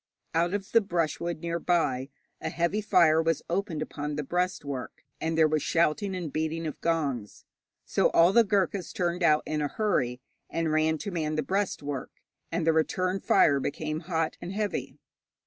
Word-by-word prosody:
Out 170 +4 +2
of 200 -1 -5
the 230 - +6
brushwood 170 -3 -2
near 170 0 -2
by 145 -7 +1 0.3
a - - -2
heavy 170 +5 0
fire 170 -6 +4
was 165 -1 0
opened 175 -4 -1
upon 150 0 -5
the 150 - -2
breastwork, 145 -5 -3 0.2
and 160 0 -1
there 160 -1 +6
was 155 0 0
shouting 170 +6 +1
and 170 -6 -5
beating 160 +1 -2
of 155 - -5
gongs. 140 -10 -2 0.4
So - - +2
all 170 +3 +5
the 235 - +7
Ghurkas 195 -3 0
turned 180 -3 -1
out 155 -3 +4
in 155 0 -2
a 145 - +1
hurry, 140 - 0 0.3
and 165 -1 -1
ran 155 +1 +2
to 200 - -5
man 155 -3 -1
the 155 - 0
breastwork, 150 -9 -2 0.4
and 170 - -1
the 165 - +4
return 185 +4 +1
fire 140 -6 +4
became 155 +3 -3
hot 165 -2 -2
and 175 - -5
heavy. 210 +1 -3
165 Hz, 175 wpm, -28 LUFS, 155-180 Hz, 0.4 s, the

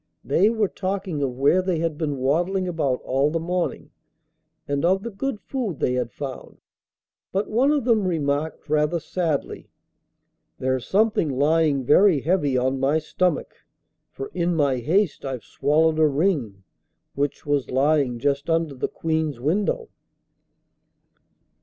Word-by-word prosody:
They 185 +9 +3
were 220 -2 +1
talking 185 -5 -3
of 130 -3 -2
where 145 +7 +4
they 185 -2 -1
had 165 -1 -1
been 150 -2 -2
waddling 175 +8 0
about 145 -7 -1
all 135 +3 +1
the 165 +2 -1
morning, 175 +2 -3 0.8
and 140 0 -1
of 190 +3 +2
the 235 - -5
good 215 +3 -3
food 230 - -4
they 125 - +1
had 125 -2 -1
found, 135 -3 -7 0.7
but 195 +2 -1
one 250 +6 +3
of 290 -5 0
them 220 -6 +3
remarked 155 -2 -2
rather 150 +2 +1
sadly, 160 -2 -3 0.9
'There's 130 -1 -1
something 210 -4 +2
lying 145 +1 +2
very 160 +3 +5
heavy 145 -5 +1
on 130 +1 0
my 140 +4 +2
stomach, 170 +2 -1 0.6
for 135 - -7
in 175 -1 0
my 140 -4 +2
haste 170 - 0
I've 130 -4 -4
swallowed 155 +3 +1
a 155 - +5
ring, 140 - -1 0.5
which 140 0 -2
was 145 -2 0
lying 135 -1 +2
just 140 +5 -1
under 165 -2 +1
the 130 - -2
Queen's 160 -5 -2
window. 200 - 0
155 Hz, 145 wpm, -23 LUFS, 140-185 Hz, 0.9 s, very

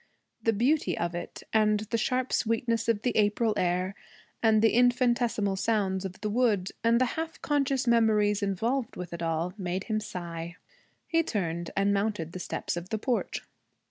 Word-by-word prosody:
The 225 - +3
beauty 235 - +1
of 170 0 -1
it, 175 0 -6
and 215 -1 +3
the 220 +2 -2
sharp 255 +3 0
sweetness 230 0 0
of 220 -2 +1
the 245 - 0
April 215 +1 +2
air, 180 +1 0 0.5
and 220 -1 +4
the 225 - +5
infinitesimal 240 -4 +2
sounds 195 -3 0
of 190 0 -6
the 210 - -1
wood, 210 -5 +1
and 230 +1 +4
the 255 - +4
half 320 +5 -4
conscious 275 -3 +1
memories 215 -3 +3
involved 225 +6 -1
with 180 -1 -6
it 170 - -6
all, 165 +2 -1
made 185 0 -2
him 215 0 -1
sigh. 170 -4 -6 0.5
He 330 0 +3
turned 170 - -2
and 200 +1 +3
mounted 200 -5 -1
the 185 - -6
steps - - -3
of 175 +1 -6
the 220 - -1
porch. 245 +3 -2
215 Hz, 175 wpm, -28 LUFS, 185-235 Hz, 0.5 s, the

